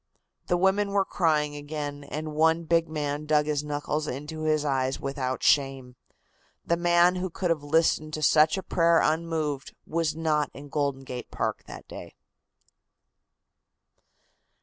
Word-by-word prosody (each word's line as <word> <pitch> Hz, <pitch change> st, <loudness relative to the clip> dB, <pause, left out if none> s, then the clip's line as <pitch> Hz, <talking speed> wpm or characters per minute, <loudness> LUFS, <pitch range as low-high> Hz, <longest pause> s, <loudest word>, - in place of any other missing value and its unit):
The 175 Hz, -, +2 dB
women 190 Hz, +3 st, +2 dB
were 200 Hz, -1 st, +2 dB
crying 150 Hz, -5 st, +1 dB
again, 145 Hz, -1 st, -5 dB
and 155 Hz, +2 st, -5 dB
one 160 Hz, +2 st, +3 dB
big 165 Hz, 0 st, +1 dB
man 150 Hz, -1 st, -3 dB
dug 150 Hz, -1 st, +3 dB
his 150 Hz, -1 st, -1 dB
knuckles 150 Hz, +1 st, -2 dB
into 150 Hz, +4 st, -5 dB
his 155 Hz, -1 st, +1 dB
eyes 135 Hz, -2 st, 0 dB
without 130 Hz, -2 st, -3 dB
shame. 135 Hz, -3 st, +2 dB, 0.7 s
The 170 Hz, -, +2 dB
man 175 Hz, +1 st, +3 dB
who 185 Hz, +1 st, -2 dB
could 175 Hz, +1 st, -2 dB
have 160 Hz, -3 st, 0 dB
listened 155 Hz, 0 st, +1 dB
to 155 Hz, -, -5 dB
such 155 Hz, +3 st, +5 dB
a 190 Hz, -, -4 dB
prayer 170 Hz, -1 st, +3 dB
unmoved 155 Hz, -3 st, -1 dB
was 160 Hz, -1 st, -1 dB
not 155 Hz, -2 st, 0 dB
in 140 Hz, +1 st, -10 dB
Golden 140 Hz, -2 st, -1 dB
Gate 125 Hz, -2 st, -7 dB
Park -, -, -3 dB
that -, -, -10 dB
day. -, -, -10 dB
155 Hz, 150 wpm, -27 LUFS, 145-165 Hz, 0.7 s, such